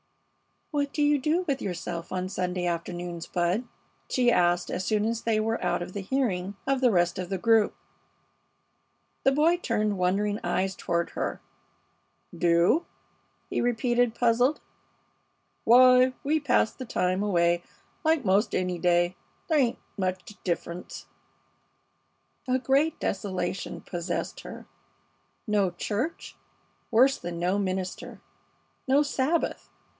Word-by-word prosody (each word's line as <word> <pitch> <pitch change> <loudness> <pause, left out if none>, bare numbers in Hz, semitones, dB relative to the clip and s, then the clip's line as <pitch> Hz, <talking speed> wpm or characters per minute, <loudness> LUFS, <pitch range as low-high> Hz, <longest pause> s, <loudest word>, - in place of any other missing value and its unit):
"What 285 -2 -1
do 295 - +1
you 290 0 +3
do 310 +7 +1
with 275 -3 -1
yourself 175 -2 -5
on 185 0 -2
Sunday 180 -1 -2
afternoons, 175 0 -4
Bud?" 180 +7 0 0.4
she 245 -1 +3
asked, 175 -3 +2
as 185 - -2
soon 210 -1 +1
as 230 0 -1
they 225 -2 +1
were 225 +1 -1
out - - 0
of 180 - -9
hearing 200 -3 -1
of 270 -1 +1
the 250 - +5
rest 175 -2 +1
of 180 -1 -4
the 195 - -1
group. 225 +1 +3 1.5
The 270 - +4
boy 320 +5 +3
turned 215 - -1
wondering 205 +3 +1
eyes 190 0 0
toward 170 0 -1
her. - - -3 1.0
"Do?" 170 - +3 0.6
he - - -1
repeated, 240 0 +1
puzzled. 245 +4 +2 1.1
"Why, 255 +2 +7
we 305 +3 +2
pass 255 -6 +2
the 255 - -8
time 185 -4 0
away, 175 -4 +2 0.4
like 315 -5 +2
'most 195 +3 +2
any 180 -1 -1
day. 175 +1 +2 0.3
There 315 -2 +4
ain't 245 -4 +1 0.2
much 185 +1 -3
difference." 175 0 -4 1.4
A 255 0 +2
great 275 +4 +1
desolation 190 -2 -3
possessed 175 0 -4
her. - - -9 0.8
No 205 -4 +2
church! 210 - -4 0.5
Worse 255 +4 +4
than 175 -1 -6
no 180 +3 +1
minister! 185 -1 -4 0.7
No 275 +3 +4
Sabbath! 290 +3 -1
205 Hz, 130 wpm, -27 LUFS, 180-255 Hz, 1.5 s, Why